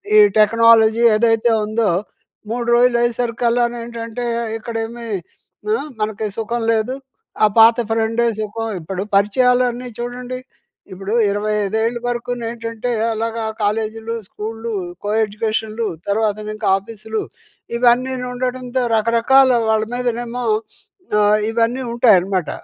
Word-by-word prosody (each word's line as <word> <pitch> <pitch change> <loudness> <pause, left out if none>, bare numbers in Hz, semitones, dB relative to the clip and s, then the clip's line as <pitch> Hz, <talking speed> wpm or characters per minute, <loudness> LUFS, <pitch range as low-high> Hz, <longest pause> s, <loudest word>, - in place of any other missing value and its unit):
ఈ - - +8 0.2
టెక్నాలజీ 230 +1 +5
ఏదైతే 225 +1 +3
ఉందో, 215 -2 +1 0.6
3 240 0 -2
రోజులయ్యేసరికల్లానేంటంటే, 240 -1 0 0.3
ఇక్కడేమీ 230 +1 -5 0.7
ఆ! - - +4 0.2
మనకి 215 0 -2
సుఖం 235 +1 -2
లేదు, 225 +4 0 0.5
ఆ - - +9
పాత 225 +1 +7
ఫ్రెండే 225 +1 +1
సుఖం. 225 +1 -3
ఇప్పుడు 185 +4 -4
పరిచయాలన్నీ 250 +4 +2
చూడండి. 250 +1 -5 0.6
ఇప్పుడూ 195 +3 -5 0.2
25 210 0 -1
ఏళ్ళు 235 +1 -1
వరుకూనేంటంటే, 235 -1 -3 0.2
అలాగా 225 0 -3 0.2
కాలేజీలు, 220 +2 -2
స్కూళ్లు, 225 +2 -6 0.3
కో-ఎడ్యుకేషన్‌లు, 220 +1 -1 0.2
తర్వాతనింక 215 0 -1
ఆఫీసులు. 220 +2 -5 0.6
ఇవన్నీనుండడంతో 250 +1 0
రకరకాల 235 +4 +4 0.2
వాళ్ళ 220 0 +3
మీదనేమో 240 0 -3 0.8
ఆహ్, 210 +1 +4
ఇవన్నీ 235 +3 0
ఉంటాయనమాట. 195 -7 +3
230 Hz, 95 wpm, -19 LUFS, 215-240 Hz, 0.8 s, ఆ